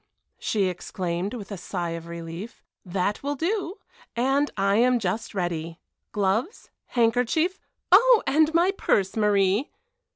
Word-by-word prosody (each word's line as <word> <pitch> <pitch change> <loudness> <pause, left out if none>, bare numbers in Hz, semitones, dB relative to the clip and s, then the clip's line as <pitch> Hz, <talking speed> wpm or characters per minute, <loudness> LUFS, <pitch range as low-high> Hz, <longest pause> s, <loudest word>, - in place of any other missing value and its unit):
she 210 -3 0
exclaimed, 180 +2 -3
with 210 -3 -8
a 200 - -4
sigh 175 -1 -4
of 165 0 -6
relief, 170 +5 -8 0.2
"that 190 +2 -2
will 285 +1 -2
do; 365 +4 -2 0.4
and 270 +4 +2
I 200 +1 +2
am 250 +2 +4
just 215 +1 -3
ready. 170 -3 -3 0.3
Gloves, 210 - -1 0.2
handkerchief 245 - +1 0.3
oh! 465 +4 +7
and 310 +2 +3
my 340 +3 +3
purse, 195 - 0
Marie." 205 +2 +2
210 Hz, 130 wpm, -25 LUFS, 185-285 Hz, 0.4 s, oh